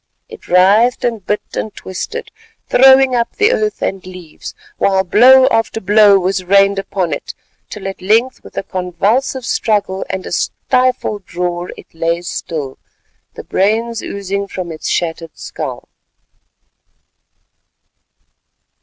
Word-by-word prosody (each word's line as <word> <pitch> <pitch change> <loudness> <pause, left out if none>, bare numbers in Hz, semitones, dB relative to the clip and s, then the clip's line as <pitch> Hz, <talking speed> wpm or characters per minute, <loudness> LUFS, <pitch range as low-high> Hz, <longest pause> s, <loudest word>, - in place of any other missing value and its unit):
It 450 -2 -13
writhed 200 +7 +4
and 230 -4 -2
bit 210 - -2
and 215 - -3
twisted, 310 - -6 0.4
throwing 265 0 +6
up 235 -1 -1
the 425 +3 +3
earth 435 -4 -1
and 195 -1 -2
leaves, 180 -4 -10 0.2
while 190 -1 +2
blow 255 +8 +6
after 225 0 0
blow 205 0 +5
was 190 0 -1
rained 195 +1 +3
upon 190 -3 -2
it, - - -6 0.3
till 200 -2 -7
at 195 - -7
length 225 +7 +1
with - - -14
a - - -1
convulsive 200 +9 -1
struggle 205 -5 0
and 190 0 -4
a - - -7
stifled 250 -1 -1
roar 175 0 -2
it - - -15
lay 165 +1 -1
still—the 150 -6 -8
brains 225 +4 0
oozing 200 0 -4
from 185 -3 -6
its 155 - -5
shattered 165 -1 -3
skull. - - -6
200 Hz, 125 wpm, -16 LUFS, 180-235 Hz, 0.4 s, throwing